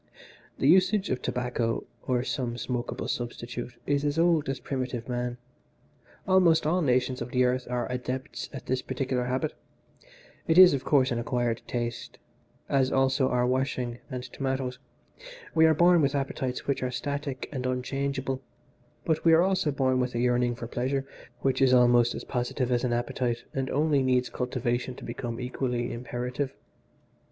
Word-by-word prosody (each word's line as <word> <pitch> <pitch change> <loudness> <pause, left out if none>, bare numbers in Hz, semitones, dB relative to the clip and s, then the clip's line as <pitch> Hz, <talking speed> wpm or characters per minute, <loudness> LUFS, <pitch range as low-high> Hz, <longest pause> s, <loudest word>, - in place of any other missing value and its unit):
"The 135 - +1
usage 190 +4 +4
of 130 -1 -1
tobacco, 125 -2 -1 0.2
or 125 -1 +1
some 125 -3 -2
smokable 120 0 -3
substitute, 120 0 -4
is 145 0 +1
as 145 +1 0
old 165 -4 +3
as 135 -1 -2
primitive 125 -2 -4
man. 125 -1 -2 0.9
Almost 180 -4 +4
all 175 +4 +2
nations 125 -3 +1
of 120 - -4
the 125 0 +2
earth 125 0 0
are 125 -1 -1
adepts 125 +1 -4
in 135 - -7
this 130 0 0
particular 130 -1 -2
habit. 130 +5 -1 0.9
It 165 0 +3
is, 185 -3 +10
of 135 -2 -1
course, 135 -2 +3
an 120 - 0
acquired 120 -1 -1
taste, 120 -1 -4 0.5
as 135 -2 +2
also 135 0 +2
are 125 0 +2
washing 125 -1 -1
and 125 -2 -5
tomatoes. 130 0 -3 0.7
We 160 0 +6
are 160 - +4
born 175 +1 +5
with 140 0 +1
appetites 135 -2 -2
which 140 - -1
are 130 - -1
static 140 +1 -4
and 130 -3 -3
unchangeable, 135 +1 -2 0.6
but 160 -2 0
we 165 - +6
are 165 +2 +6
also 190 -4 +1
born 130 -2 +1
with 125 -1 -1
a - - 0
yearning 120 0 +2
for 120 - -6
pleasure 130 +3 -2 0.4
which 135 0 +1
is 130 -1 +6
almost 120 -1 +5
as - - -5
positive 125 0 -2
as 120 0 +1
an 125 - 0
appetite 120 0 -1
and 135 -1 -2
only 150 -1 +2
needs 125 -1 +2
cultivation 125 0 -2
to - - -11
become 120 -1 -5
equally 125 -1 -2
imperative. 125 +3 -4
130 Hz, 165 wpm, -28 LUFS, 125-140 Hz, 0.9 s, is